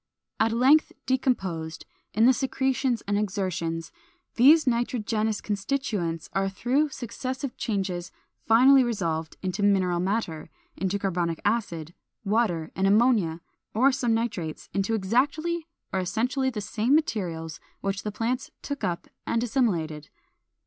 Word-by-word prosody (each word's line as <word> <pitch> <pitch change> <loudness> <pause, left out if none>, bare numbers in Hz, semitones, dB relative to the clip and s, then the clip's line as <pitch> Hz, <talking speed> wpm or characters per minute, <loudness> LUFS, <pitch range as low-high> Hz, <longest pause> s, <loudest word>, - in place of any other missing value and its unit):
At 225 +1 +3
length 265 +7 +4
decomposed, 190 -12 -1 0.3
in 220 +2 +5
the 260 - +7
secretions 265 -1 0
and 205 0 0
excretions, 185 -5 -2 0.4
these 300 +7 +6
nitrogenous 225 -3 0
constituents 200 -6 -2
are 195 +2 +1
through 260 +9 +1
successive 260 +1 -5
changes 190 -5 -2 0.4
finally 260 +4 +7
resolved 165 -9 -2
into 185 +2 -2
mineral 190 -3 +3
matter, 180 -5 -2 0.3
into 190 +2 -1
carbonic 175 -4 -1
acid, 175 -7 -1 0.3
water, 195 -7 +1
and 190 +1 +2
ammonia 205 -6 +3 0.3
or 260 +5 +5
some 250 -4 +1
nitrates, 205 -9 -3
into 200 +3 0
exactly 290 - 0 0.3
or 190 - +1
essentially 235 +8 0
the 225 -5 -4
same 225 +6 +1
materials 170 - -1 0.2
which 195 0 -2
the 210 - -4
plants 235 +4 -2
took 285 -1 -5
up 170 -1 -2 0.2
and 230 - +1
assimilated. 170 - 0
215 Hz, 125 wpm, -26 LUFS, 180-250 Hz, 0.4 s, the